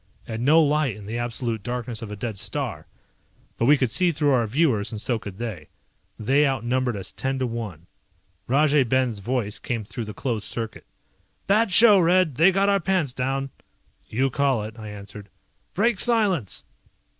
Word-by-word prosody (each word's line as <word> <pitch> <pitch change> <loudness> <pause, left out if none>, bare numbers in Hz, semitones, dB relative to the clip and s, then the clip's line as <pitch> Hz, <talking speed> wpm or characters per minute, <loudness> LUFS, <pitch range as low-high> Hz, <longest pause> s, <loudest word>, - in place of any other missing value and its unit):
And 110 +1 -5
no 160 +5 +5
light 150 -5 +1
in 105 -2 -11
the 115 +3 -4
absolute 120 -2 -2
darkness 120 0 -5
of 115 - -7
a - - -5
dead 105 -1 -5
star. - - -4 0.7
But 115 - +2
we 145 +1 +6
could 130 -4 0
see 180 +4 +4
through 145 -2 +1
our 120 -4 +2
viewers, 115 -5 +1
and 110 - -5
so 115 +1 -1
could 100 -3 -9
they. 105 -10 -6 0.5
They 135 +7 +2
outnumbered 125 -2 -1
us 95 -1 -6
ten 135 0 -3
to 130 - -1
one. 110 -9 -6 0.6
Rajay 145 +2 +3
Ben's 125 -3 0
voice 110 -1 -2
came 115 -3 -3
through 115 +3 -6
the 105 -1 -8
closed 115 -4 -2
circuit. 115 -2 -5 0.6
"Bad 210 +2 +2
show, 210 +1 +8
Red, 180 -2 +3
they 165 +9 +5
got 195 +1 +1
our 200 0 +3
pants 180 -7 0
down!" 135 +1 -2 0.6
"You 130 +4 0
call 135 -5 +1
it," 110 +2 -9
I 110 -1 -8
answered. 100 0 -10 0.5
"Break 205 +2 +1
silence!" 205 - +1
125 Hz, 180 wpm, -24 LUFS, 110-150 Hz, 0.7 s, show